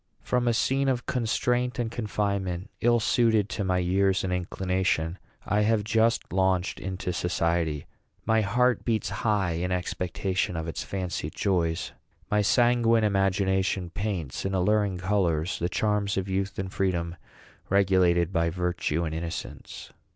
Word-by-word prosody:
From 125 -1 0
a 120 - +3
scene 135 +3 +1
of 125 -3 -1
constraint 125 +1 0
and 120 -2 -2
confinement, 100 -4 -2
ill 120 0 +4
suited 110 -2 +2
to 100 - -2
my 95 -1 +1
years 95 +2 +2
and 95 -1 -1
inclination, 90 -2 -1 0.3
I 105 0 +1
have 105 0 +2
just 110 -3 +1
launched 95 -1 +1
into 95 -1 -4
society. 85 -3 0 0.4
My 110 0 +3
heart 125 +3 +2
beats 110 -3 0
high 105 -5 +1
in 85 +3 -2
expectation 90 0 -2
of 80 0 -4
its 80 - -4
fancied 90 -5 -4
joys. 85 -3 0 0.4
My 105 0 +3
sanguine 115 +1 +3
imagination 95 -2 +1
paints, 95 -8 -3
in 95 0 -1
alluring 100 +1 +2
colors, 90 -3 0
the 85 - -1
charms 105 0 0
of 95 0 -1
youth 95 0 -2
and 95 0 -4
freedom, 85 -3 -1 0.5
regulated 95 -2 +3
by 85 -1 +2
virtue 90 -2 -1
and 80 -1 -3
innocence. 85 +1 -6
95 Hz, 145 wpm, -27 LUFS, 90-105 Hz, 0.5 s, ill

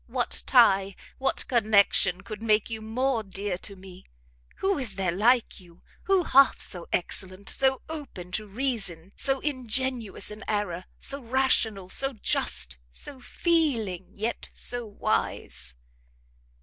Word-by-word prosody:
what 245 0 -1
tie, 195 -6 +5 0.2
what 270 - 0
connection, 200 -5 +3
could 215 +1 -8
make 215 0 +2
you 220 -1 -3
more 240 +2 0
dear 195 -1 -3
to 200 +2 -7
me? 185 -1 -13 0.5
Who 385 -4 0
is 230 -7 -4
there 190 -2 0
like 230 +7 +3
you? 175 -2 -18 0.2
Who 385 -2 +4
half 275 -3 +5
so 175 -2 -3
excellent? 185 +2 -2
So 265 -1 +1
open 275 - -7
to 215 +3 -2
reason, 200 -7 -2
so 270 -1 0
ingenuous 255 -5 0
in 210 +1 -8
error! 200 -4 -1
so 280 +1 -1
rational! 230 -6 +1
so 270 +7 0
just! 65 - -1
so 265 - -7
feeling, 245 - 0
yet 225 +3 -3
so 245 -2 -2
wise!" 65 - -2
215 Hz, 135 wpm, -27 LUFS, 190-260 Hz, 0.5 s, tie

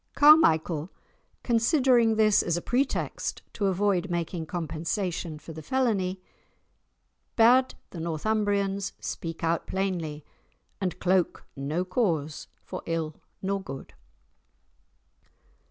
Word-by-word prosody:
Carmichael, 170 - +5 0.5
considering 235 -1 +3
this 215 -1 +4
as 170 -1 0
a - - -3
pretext 260 +3 -1
to 200 - 0
avoid 190 -1 +1
making 170 -1 -3
compensation 165 0 -3
for 155 +2 -10
the 160 - -8
felony, 195 - 0 1.2
bade 250 +3 +5 0.2
the 170 - -7
Northumbrians 200 +3 0
speak 165 0 -5
out 165 0 0
plainly, 175 -6 -2 0.6
and 185 -2 -2
"cloke 185 -1 +1
no 150 +6 -2
cause 170 - -1 0.2
for - - -6
ill 165 -2 -2 0.3
nor 195 +1 -1
good." 135 -7 -8
185 Hz, 105 wpm, -27 LUFS, 165-215 Hz, 1.2 s, Carmichael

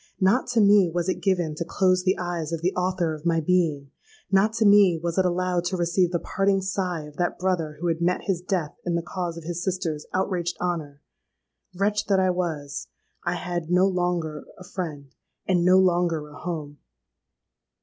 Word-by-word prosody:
Not 195 +7 +3
to 235 -2 +2
me 200 -3 +6
was 175 +1 -1
it - - -2
given 180 -5 +1
to 155 - -3
close 185 +1 +2
the 185 +1 +2
eyes 175 -3 -3
of 165 -1 -3
the 180 - +1
author 180 -3 0
of 155 -1 -8
my 165 -1 +2
being: 155 -5 0 0.4
not 195 +3 +4
to 225 -1 +1
me 200 -4 +6
was 170 +2 -2
it 185 - +3
allowed 180 0 0
to 185 +1 -1
receive 175 +1 +2
the 175 - +1
parting 195 +2 +1
sigh 185 -3 -2
of 150 0 -12
that 175 -1 -1
brother 170 -5 -1
who 175 - -4
had 165 -1 0
met 180 +1 +1
his 185 -3 -1
death 180 -5 -2
in 175 -1 -1
the 170 - -1
cause 175 -1 -4
of 170 - -8
his 175 +1 -4
sister's 175 -5 -2
outraged 180 -2 -1
honour! 155 -5 -3 0.7
Wretch 205 +2 0
that 195 -2 +3
I 185 -1 +3
was;—I 145 - -5
had 175 -2 -4
no 180 +1 +4
longer 175 -4 -1
a 185 - -11
friend—and 170 +1 -4
no 185 +1 +6
longer 175 -4 +2
a - - -14
home! 155 -4 -6
175 Hz, 190 wpm, -25 LUFS, 165-185 Hz, 0.7 s, me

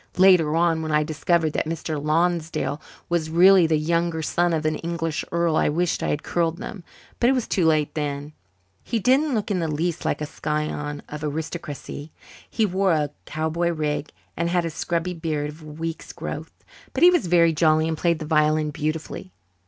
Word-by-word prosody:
Later 180 -5 +5
on, 165 -1 +2
when 155 -1 -3
I 150 0 +3
discovered 155 +1 0
that - - -1
Mr. 160 -2 -3
Lonsdale 155 -3 0 0.3
was 170 -2 0
really 180 +1 +6
the 160 -1 +2
younger 165 +1 0
son 175 +3 +1
of 160 -1 -1
an 155 -1 +1
English 165 -2 -3
earl, 170 -1 +1
I - - +3
wished 170 +3 0
I - - -1
had 150 - -1
curled 170 -1 0
them, 190 0 -7 0.4
but 240 - +4
it - - +4
was 255 -3 -1
too 175 -4 +2
late 155 -2 +2
then. 145 0 -3 0.5
He 230 - -1
didn't 265 +6 +3
look 210 -1 -2
in 190 - +1
the 165 - -1
least 160 +3 -2
like - - -1
a 150 - -2
scion 150 -1 -3
of 150 0 -7
aristocracy. 150 -1 -5 0.4
He 220 - +1
wore 190 -1 +2
a 150 -2 0 0.2
cowboy 160 +2 -1
rig 155 -2 -2 0.3
and 170 0 -1
had 175 -1 +1
a 165 - -2
scrubby 170 +3 -2
beard 155 -3 -2
of 155 +2 -15
a - - -12
week's 160 +2 -6
growth. - - -7 0.3
But 270 - 0
he 355 - +9
was 350 - +1
very 170 -1 +4
jolly 155 0 +3
and 160 - -1
played 170 +1 +1
the 155 - -6
violin 155 0 +2
beautifully. 155 - -4
160 Hz, 195 wpm, -24 LUFS, 155-175 Hz, 0.5 s, he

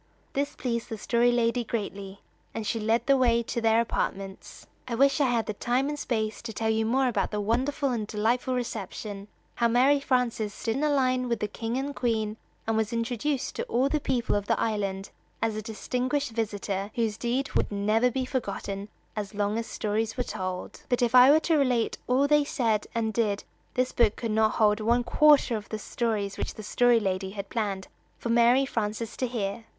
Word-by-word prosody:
This 285 +1 -1
pleased 235 -2 -3
the 225 - -4
Story 235 +3 +2
Lady 240 0 +1
greatly, 200 -3 -5 0.3
and 225 - -3
she 225 +2 -1
led 225 +2 +1
the 275 -2 +5
way 235 -3 +3
to 235 - -3
their 225 0 +4
apartments. 195 -4 -3 0.2
I 235 - -2
wish 275 +4 +3
I 275 - +4
had 235 -2 +1
the 215 - -3
time 250 +6 0
and 295 0 -4
space 220 -5 -2
to 235 - -6
tell 220 0 -1
you 220 0 +1
more 260 +3 +2
about 245 - 0
the 210 - -3
wonderful 260 +6 0
and 220 -4 -2
delightful 235 +5 0
reception 210 -3 -5 0.3
how 235 - +2
Mary 260 +5 +4
Frances 245 -6 0
stood 225 +1 -2
in - - -2
line 255 -4 +2
with 235 -2 0
the 210 - -1
King 225 +3 -3
and 280 +1 -3
Queen, 220 -3 -1 0.3
and 225 - 0
was 220 0 0
introduced 245 +4 -2
to - - -2
all 255 +4 +1
the 305 - +1
people 255 -4 0
of 205 0 -1
the - - +1
island 200 -3 -2 0.3
as 225 -1 0
a 215 - -3
distinguished 250 +6 -2
visitor 205 -3 -2
whose 225 -3 0
deed 250 +4 -1
would - - 0
never 215 +4 +2
be 260 +1 -2
forgotten 200 -5 -4 0.3
as 210 -1 -5
long 205 +1 0
as 230 - -4
stories 220 +2 -2
were 250 - +1
told. 185 -3 -5
But 245 -1 +2
if 240 0 +1
I 250 +1 +9
were 300 +2 +7
to 325 -2 +2
relate 250 -4 +1
all 265 +3 +3
they 295 0 +4
said 230 -7 0
and 220 -1 0
did 210 -3 0 0.3
this 255 0 +1
book 225 -3 +2
would 230 - 0
not 220 0 +3
hold 210 -1 +3
one 235 +3 +2
quarter 285 0 +5
of 210 -1 -6
the 215 - -3
stories 210 -2 -2
which - - -3
the 215 - -8
Story 240 +2 +3
Lady 190 -2 -2
had 200 0 -6
planned 200 -4 -2 0.3
for 235 - -5
Mary 240 +3 +5
Frances 220 -3 -3
to 255 - 0
hear. 225 -2 -3
230 Hz, 205 wpm, -27 LUFS, 210-250 Hz, 0.3 s, I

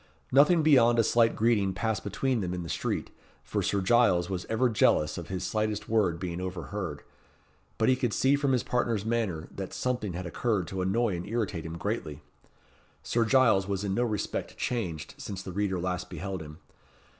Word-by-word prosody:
Nothing 150 +5 +5
beyond 120 -6 +5
a 115 - +5
slight 115 +1 +3
greeting 105 -4 +2
passed 110 +1 -1
between 125 +3 -1
them 90 -1 -2
in 90 - -4
the 85 - -7
street, - - -2 0.3
for - - -2
Sir 100 - 0
Giles 95 -4 +3
was 90 -1 -3
ever 120 +3 +2
jealous 75 -9 +2
of 85 -2 -6
his 95 0 -4
slightest 110 0 -1
word 100 -7 +1
being 90 -1 -4
overheard; 90 -3 -5 0.7
but 110 - +2
he 130 - +5
could 125 -3 -1
see 135 +5 +3
from 140 -1 +1
his 125 -2 +2
partner's 115 -4 0
manner 110 -9 -1
that 95 -1 -6
something 125 -7 -2
had 90 +2 -5
occurred 100 +2 -1
to 95 -1 -3
annoy 100 +2 +1
and 85 +2 -5
irritate 100 -7 -2
him 80 +1 -6
greatly. 85 -7 -4 0.8
Sir 115 - +1
Giles 110 -5 +4
was 100 0 -2
in 100 -2 -1
no 120 - +1
respect 110 -4 -3
changed 90 -11 -3
since 95 -2 -6
the 95 - -6
reader 95 -1 -1
last 90 0 -3
beheld 95 -2 -5
him. 75 0 -10
100 Hz, 190 wpm, -28 LUFS, 90-115 Hz, 0.8 s, Nothing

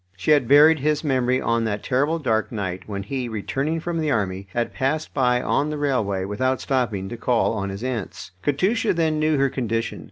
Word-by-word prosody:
She 95 - 0
had 145 -5 +4
buried 150 +4 +7
his 150 +2 0
memory 130 -3 +1
on 115 -2 0
that 105 -1 -2
terrible 145 +6 +1
dark 115 -8 0
night 95 -3 -4
when 100 -1 -4
he, 125 +3 -4
returning 135 +9 -2
from 165 0 -3
the 155 -1 0
army, 100 -6 -1
had 120 +4 -2
passed 150 +4 -1
by 125 -2 +2
on 145 +2 +1
the 150 - -3
railway 110 -10 0
without 130 +6 -1
stopping 115 -8 -1
to 120 - -6
call 120 -1 +1
on 100 -3 -3
his 100 +3 -6
aunts. 115 -7 -4
Katusha 190 - +1
then 160 -2 +1
knew 155 -1 +2
her 140 0 +3
condition. 115 -3 -2
130 Hz, 200 wpm, -23 LUFS, 110-150 Hz, -, buried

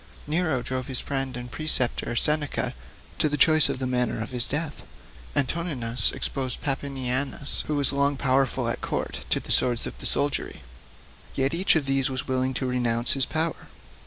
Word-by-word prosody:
Nero 155 -5 0
drove 130 0 -4
his 130 -2 0
friend 135 -2 -3
and 125 0 -7
preceptor, 125 -6 +2
Seneca, 150 +3 +1 0.5
to 155 - +2
the 150 - -2
choice 155 -1 +6
of 140 - -2
the 130 - -3
manner 125 -2 -1
of 115 - -5
his 125 -2 +1
death. 150 +1 -3 0.5
Antoninus 130 -6 0
exposed 130 -3 -3
Papinianus, 135 0 -2
who 150 - -1
was 145 -1 +2
long 140 0 +1
powerful 135 -1 +1
at - - -1
court, - - -4
to - - +2
the - - -6
swords 120 -2 +3
of - - -6
the - - +1
soldiery. 145 - -1 0.7
Yet 135 +2 +1
each 180 +2 +3
of 155 -3 +1
these 135 0 +1
was 130 -1 -4
willing 130 0 0
to 130 - -2
renounce 120 -2 +3
his 135 -2 +2
power. 160 +1 -2
135 Hz, 175 wpm, -25 LUFS, 125-145 Hz, 0.7 s, choice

